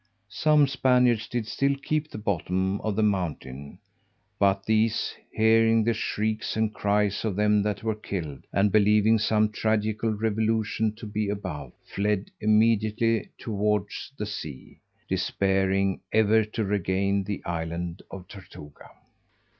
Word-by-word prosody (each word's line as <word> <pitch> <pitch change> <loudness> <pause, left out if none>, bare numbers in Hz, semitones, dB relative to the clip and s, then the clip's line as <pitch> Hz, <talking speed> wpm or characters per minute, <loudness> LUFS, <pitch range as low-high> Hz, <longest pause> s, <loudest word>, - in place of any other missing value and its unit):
Some 150 +6 +3
Spaniards 125 -4 +2
did 120 -2 -3
still 140 +5 0
keep 155 +2 -2
the - - -8
bottom 95 -1 -1
of 110 -2 -2
the 110 - +1
mountain; 75 -9 -3 0.6
but 100 0 +2
these, 110 0 +1 0.2
hearing 115 0 +4
the 115 +1 +2
shrieks 110 0 -2
and 110 -1 0
cries 105 -1 0
of 110 -4 -1
them 105 0 +3
that 105 +1 -2
were 110 -1 0
killed, 85 -10 -6
and 100 +1 +2
believing 105 +1 +4
some 105 0 +2
tragical 110 +1 0
revolution 110 0 0
to 115 - -10
be 105 0 -2
above, 75 -10 -5
fled 105 0 -2
immediately 110 +1 +2
towards 105 +1 -2
the 105 - -3
sea, 75 -10 -8 0.3
despairing 95 0 0
ever 110 0 +4
to 110 +1 -3
regain 100 0 0
the 100 0 -5
island 85 0 -4
of 95 -2 -9
Tortuga. 90 -7 -13
105 Hz, 130 wpm, -26 LUFS, 100-110 Hz, 0.6 s, hearing